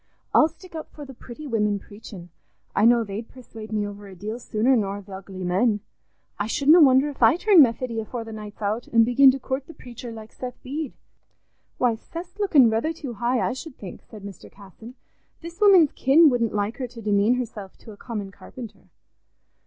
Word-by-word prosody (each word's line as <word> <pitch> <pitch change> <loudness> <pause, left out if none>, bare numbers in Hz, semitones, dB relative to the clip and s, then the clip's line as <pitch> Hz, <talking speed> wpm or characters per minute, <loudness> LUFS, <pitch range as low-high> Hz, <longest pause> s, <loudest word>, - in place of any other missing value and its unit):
"I'll 310 - +6
stick 335 +3 -16
up 320 -1 -7
for 295 - -10
the 270 - -11
pretty 250 +4 -11
women 210 -6 0
preachin'; 200 -4 -12 0.4
I 205 - +3
know 235 0 +5
they'd 215 +2 -7
persuade 225 -4 -11
me 210 -1 -1
over 205 0 -9
a 190 - -12
deal 215 +6 -6
sooner 235 +2 +1
nor 200 -3 -1
th' 200 - -15
ugly 190 -1 -8
men. 205 +4 +1 0.6
I 205 - -1
shouldna 295 +8 +5
wonder 265 0 +5
if 280 - -11
I 225 +4 +6
turn 375 -1 +6
Methody 235 -2 +1
afore 230 +2 -5
the 225 - -10
night's 215 0 -9
out, 215 +4 -2
an' 230 -1 +5
begin 245 +4 +6
to 265 +1 +1
coort 265 +1 -4
the 330 - -12
preacher, 240 -1 -10
like 220 -1 -11
Seth 250 -1 -7
Bede." 285 +1 -5 0.8
"Why, 245 -2 +2
Seth's 345 - -9
looking 315 - +5
rether 225 +9 0
too 285 -6 -7
high, 240 +3 0
I - - -2
should 260 +2 -9
think," 190 -4 -10
said 215 -3 -13
Mr. 200 -3 -11
Casson. 210 +5 -14 0.5
"This 340 +4 -10
woman's 375 -8 +6
kin 295 +3 +5
wouldn't 235 -3 0
like 205 +2 -2
her 255 - -4
to 235 - -13
demean 205 +3 +2
herself 225 -6 -6
to 225 - -13
a - - -11
common 210 -5 -6
carpenter." 230 +3 -12
235 Hz, 200 wpm, -24 LUFS, 210-270 Hz, 0.8 s, I'll